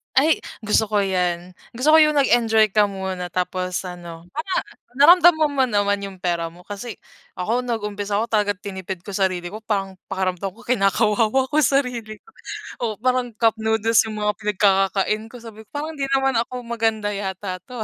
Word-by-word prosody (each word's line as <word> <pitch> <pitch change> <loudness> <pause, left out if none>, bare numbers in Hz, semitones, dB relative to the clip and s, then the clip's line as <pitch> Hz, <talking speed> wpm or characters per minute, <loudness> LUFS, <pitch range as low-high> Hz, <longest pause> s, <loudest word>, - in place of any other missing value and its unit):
Ay 305 +4 +4 0.2
gusto 215 +1 +2
ko 205 -1 +1
'yan, 180 -1 -1 0.2
gusto 255 +6 0
ko 315 - +8
yung 305 -1 +5
nag-enjoy 230 -6 +3
ka 210 +1 +4
muna 190 -3 -5
tapos 180 0 -2
ano, 175 -2 -9
parang 320 - -2 0.3
naramdaman 315 +2 +6
mo 260 - +4
naman 205 -3 0
'yung 190 -2 -10
pera 170 -2 -1
mo 180 - -15
kasi 205 +5 -7 0.4
ako 230 +7 -1
nag-umpisa 210 -3 -2
ako 230 - -3
tagat 205 -2 0
tinipid 190 -3 -6
ko 200 - -11
sarili 185 -3 -1
ko 210 - -7
parang 195 -3 -2
pakiramdam 190 0 -2
ko 225 - -17
kinakawawa 220 +3 +2
ko 305 - -1
sarili 245 -6 -1
ko, 450 - -21 0.6
oo, 220 - -1
parang 250 -2 0
cup 225 0 +2
noodles 220 0 +2
'yung 215 -1 -5
mga 210 0 0
pinagkakakain 200 0 +1
ko 245 - -10
sabi 220 -1 -11
ko, - - -44
parang 305 +1 -4
hindi 275 - -1
naman 270 -2 +2
ako 250 -1 -7
maganda 225 -3 -1
yata 190 -2 -4
'to, 250 -3 -7
ah. - - 0
210 Hz, 180 wpm, -22 LUFS, 190-240 Hz, 0.6 s, ko